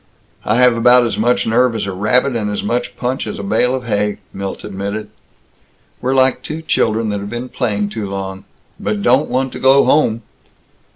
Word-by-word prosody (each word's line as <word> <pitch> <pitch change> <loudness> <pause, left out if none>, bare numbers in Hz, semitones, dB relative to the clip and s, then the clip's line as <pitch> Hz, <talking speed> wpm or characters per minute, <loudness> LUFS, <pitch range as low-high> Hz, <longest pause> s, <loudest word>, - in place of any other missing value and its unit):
"I - - +1
have 125 -1 +5
about 120 +1 +5
as 115 - -2
much 120 +3 +2
nerve 120 +1 +2
as 110 - -2
a 100 - -3
rabbit, 120 +7 +1
and 105 -3 -1
as 105 - -3
much 120 +1 -2
punch 125 -1 -2
as 105 - -5
a - - -6
bale 115 +5 +1
of 130 - -4
hay," 105 -2 0 0.2
Milt 100 0 -5
admitted. 100 +1 -5 0.9
"We're 130 +1 0
like 130 -1 +3
two 160 +1 -6
children 110 -6 +1
that 100 -1 -2
have 100 +1 -6
been 120 +3 -5
playing 105 -6 -1
too 105 -2 -5
long." 95 0 -5 0.3
"But 105 0 -2
don't 130 +5 +3
want 130 +1 0
to - - -6
go 135 +1 +5
home!" 115 -6 +2
115 Hz, 195 wpm, -17 LUFS, 105-125 Hz, 0.9 s, have